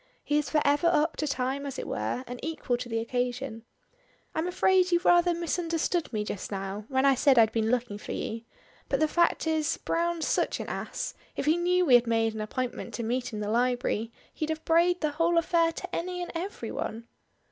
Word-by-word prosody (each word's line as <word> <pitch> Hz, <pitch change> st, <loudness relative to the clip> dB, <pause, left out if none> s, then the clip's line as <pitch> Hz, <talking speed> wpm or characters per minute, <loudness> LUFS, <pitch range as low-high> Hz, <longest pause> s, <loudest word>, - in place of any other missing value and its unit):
He 295 Hz, 0 st, +2 dB
is 300 Hz, -, -3 dB
for 300 Hz, -, +2 dB
ever 290 Hz, +4 st, +3 dB
up 315 Hz, -1 st, +2 dB
to 305 Hz, -, -1 dB
time 270 Hz, 0 st, -1 dB
as 280 Hz, -2 st, -5 dB
it -, -, -4 dB
were, 255 Hz, -, -2 dB
and 245 Hz, 0 st, -7 dB
equal 310 Hz, -5 st, -2 dB
to 240 Hz, 0 st, -6 dB
the 225 Hz, -, -1 dB
occasion. 245 Hz, 0 st, -2 dB, 0.7 s
"I'm 320 Hz, +2 st, -1 dB
afraid 365 Hz, 0 st, +3 dB
you 345 Hz, -, +5 dB
rather 350 Hz, 0 st, +5 dB
misunderstood 340 Hz, 0 st, -1 dB
me 215 Hz, -3 st, -1 dB
just 205 Hz, -1 st, -5 dB
now, 195 Hz, +1 st, -4 dB
when 265 Hz, 0 st, +1 dB
I 275 Hz, -, +6 dB
said 265 Hz, 0 st, +4 dB
I'd 225 Hz, -1 st, +6 dB
been 220 Hz, -1 st, 0 dB
looking 235 Hz, -4 st, -1 dB
for -, -, -7 dB
you 225 Hz, +1 st, -3 dB, 0.5 s
but -, -, +1 dB
the 310 Hz, -, +3 dB
fact 340 Hz, +2 st, +2 dB
is, 315 Hz, -1 st, 0 dB
Browne's 340 Hz, -1 st, -1 dB
such -, -, 0 dB
an -, -, -5 dB
ass, -, -, -4 dB, 0.2 s
if -, -, -2 dB
he 310 Hz, +2 st, +4 dB
knew 360 Hz, +1 st, +2 dB
we 265 Hz, -, +4 dB
had 245 Hz, -1 st, +6 dB
made 225 Hz, -1 st, +2 dB
an 220 Hz, -, -4 dB
appointment 250 Hz, +3 st, -4 dB
to 235 Hz, -, -3 dB
meet 245 Hz, +3 st, -2 dB
in 210 Hz, -1 st, -4 dB
the 205 Hz, -, -2 dB
library, 240 Hz, -2 st, 0 dB, 0.2 s
he'd 310 Hz, -, -3 dB
have 315 Hz, 0 st, -3 dB
brayed 345 Hz, +2 st, +3 dB
the 305 Hz, -2 st, +1 dB
whole 335 Hz, +3 st, +2 dB
affair 335 Hz, 0 st, +3 dB
to 365 Hz, +1 st, -6 dB
any 360 Hz, +1 st, -3 dB
and -, -, -6 dB
every 360 Hz, +4 st, -5 dB
one." 230 Hz, +1 st, -5 dB
285 Hz, 215 wpm, -28 LUFS, 235-335 Hz, 0.7 s, I